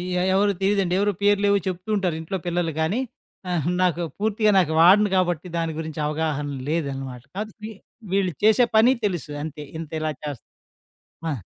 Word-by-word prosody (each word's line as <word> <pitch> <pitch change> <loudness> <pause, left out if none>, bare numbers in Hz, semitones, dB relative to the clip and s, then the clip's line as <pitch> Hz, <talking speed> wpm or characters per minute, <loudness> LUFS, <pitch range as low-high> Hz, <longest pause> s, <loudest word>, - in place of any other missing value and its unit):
య - - +1 0.2
ఎవరూ 200 +1 +3
తెలీదండి. 195 -2 +2
ఎవరొ 205 +1 +2
పేర్లేవొ 205 0 +4
చెప్తూ 185 +3 -4
ఉంటారు 185 -5 0
ఇంట్లో 175 +4 -3
పిల్లలు 175 -1 0
గాని, 185 +10 0 0.5
ఆహా! 170 -2 0
నాకు 175 -1 +1 0.2
పూర్తిగా 215 0 +2
నాకు 160 -4 +1
వాడను 200 +5 +6
కాబట్టి 175 -2 0
దాని 165 -1 -1
గురించి 160 -1 -5
అవగాహన 150 -1 -1 0.2
లేదనమాట. 135 -6 -3
కాతే 215 +1 -4
వి 220 - -6 0.4
వీళ్ళు 195 -2 +2
చేసే 220 +3 +6
పని 225 +3 +6
తెలుసు 175 -6 -2
అంతే 150 -1 -6 0.2
ఇంతిలా 155 -1 -3
చేస్తా 145 -6 -6 0.9
ఆ! 140 - -2
175 Hz, 155 wpm, -24 LUFS, 155-200 Hz, 0.9 s, వాడను